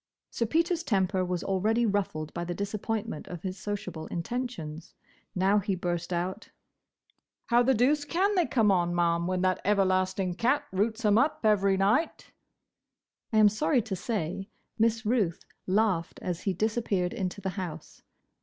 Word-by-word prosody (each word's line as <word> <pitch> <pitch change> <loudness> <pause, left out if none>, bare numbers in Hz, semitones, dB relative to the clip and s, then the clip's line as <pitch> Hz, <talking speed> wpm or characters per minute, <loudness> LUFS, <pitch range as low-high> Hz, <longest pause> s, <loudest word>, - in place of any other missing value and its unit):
Sir 230 - -1
Peter's 335 +5 +1
temper 190 - +1
was 180 -1 -2
already 215 +5 +1
ruffled 190 -7 -1
by 170 - -3
the 175 0 -4
disappointment 210 -1 -3
of 175 -2 -8
his 190 0 -4
sociable 185 -6 -5
intentions. 170 -5 -5 0.4
Now 195 +3 +3
he 200 -1 -1
burst 175 -1 -3
out, 180 +4 -3 1.0
"How 240 0 +4
the 260 +2 +3
doose 285 +6 +3
can 370 +7 +1
they 360 -4 +2
come 220 -5 +3
on, 175 -2 +1
Ma'am, 170 0 +1
when 185 0 0
that 185 0 +1
everlasting 185 -1 +1
cat 250 +10 +1
roots 220 +5 -1
'em 210 +1 +5
up 290 +4 +1
every 200 -3 +3
night?" 215 - +1 1.0
I 220 - +1
am 215 -1 +7
sorry 245 +3 +1
to 210 -4 -3
say, 190 0 -3 0.3
Miss 225 0 +2
Ruth 210 -7 0 0.2
laughed 190 -4 +1
as 180 -1 -3
he 195 - 0
disappeared 205 -2 0
into 185 +1 -3
the 195 -1 -3
house. 175 -5 -7
200 Hz, 155 wpm, -28 LUFS, 180-225 Hz, 1.0 s, am